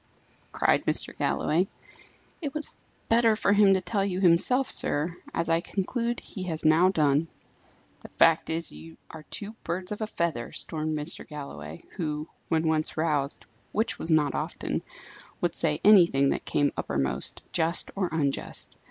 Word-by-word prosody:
cried -, -, +2 dB
Mr. -, -, 0 dB
Galloway. 175 Hz, +5 st, +1 dB, 0.7 s
"It 290 Hz, -3 st, -4 dB
was 305 Hz, -, -3 dB, 0.4 s
better 230 Hz, -1 st, +4 dB
for 205 Hz, -1 st, +2 dB
him 200 Hz, -2 st, +5 dB
to 190 Hz, -, 0 dB
tell 200 Hz, +1 st, -1 dB
you 190 Hz, -2 st, -2 dB
himself, 195 Hz, +9 st, +4 dB
sir; 160 Hz, +4 st, +1 dB, 0.2 s
as 170 Hz, -, -2 dB
I 165 Hz, 0 st, +2 dB
conclude 235 Hz, +6 st, -2 dB
he 195 Hz, -, -9 dB
has 160 Hz, -3 st, -4 dB
now 160 Hz, +4 st, +5 dB
done." 150 Hz, -3 st, +2 dB, 0.7 s
"The -, -, -12 dB
fact 165 Hz, -1 st, +3 dB
is, 165 Hz, 0 st, -3 dB
you 80 Hz, +2 st, -12 dB
are 160 Hz, -, -9 dB
two 205 Hz, 0 st, -5 dB
birds 180 Hz, +3 st, -3 dB
of 210 Hz, -, -5 dB
a 215 Hz, -, -1 dB
feather," 160 Hz, -, -2 dB
stormed 155 Hz, -1 st, -2 dB
Mr. 150 Hz, +3 st, -2 dB
Galloway, 150 Hz, +2 st, -8 dB
who, 155 Hz, -3 st, -3 dB, 0.2 s
when 160 Hz, 0 st, +1 dB
once 155 Hz, -1 st, +1 dB
roused, 150 Hz, -3 st, -1 dB, 0.3 s
which 220 Hz, +2 st, -1 dB
was 160 Hz, -, -4 dB
not 150 Hz, -3 st, +3 dB
often, -, -, -3 dB, 0.6 s
would 175 Hz, -2 st, 0 dB
say 150 Hz, -2 st, 0 dB
anything 170 Hz, -10 st, +6 dB
that -, -, -2 dB
came 145 Hz, -1 st, +1 dB
uppermost, 70 Hz, -1 st, 0 dB
just 165 Hz, +1 st, +3 dB
or 190 Hz, -3 st, -1 dB
unjust. 145 Hz, -4 st, -3 dB
165 Hz, 160 wpm, -27 LUFS, 150-195 Hz, 0.7 s, anything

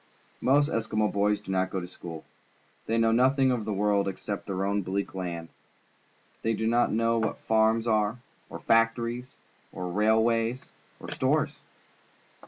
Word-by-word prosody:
Most 145 Hz, +3 st, +4 dB
Eskimo 110 Hz, -1 st, 0 dB
boys 105 Hz, +1 st, +1 dB
do 95 Hz, -, -7 dB
not 95 Hz, 0 st, +1 dB
go 95 Hz, -, -2 dB
to 90 Hz, -, -6 dB
school. 85 Hz, -3 st, -9 dB, 0.6 s
They 115 Hz, -, +1 dB
know 115 Hz, 0 st, +3 dB
nothing 130 Hz, +3 st, +3 dB
of 120 Hz, -4 st, -1 dB
the 110 Hz, -, -2 dB
world 100 Hz, 0 st, +1 dB
except 100 Hz, +1 st, -5 dB
their 95 Hz, -1 st, -2 dB
own 100 Hz, +1 st, 0 dB
bleak 100 Hz, +2 st, -3 dB
land. 85 Hz, -3 st, -5 dB, 0.9 s
They 115 Hz, 0 st, 0 dB
do 110 Hz, -, -2 dB
not 120 Hz, +2 st, +2 dB
know 115 Hz, +1 st, +2 dB
what 110 Hz, -, -1 dB
farms 110 Hz, +1 st, +2 dB
are, 110 Hz, 0 st, +1 dB, 0.3 s
or -, -, -7 dB
factories, 115 Hz, +2 st, +1 dB, 0.4 s
or 90 Hz, -1 st, -5 dB
railways, 115 Hz, +4 st, +1 dB, 0.3 s
or -, -, -8 dB
stores. -, -, 0 dB
110 Hz, 155 wpm, -27 LUFS, 100-115 Hz, 0.9 s, Most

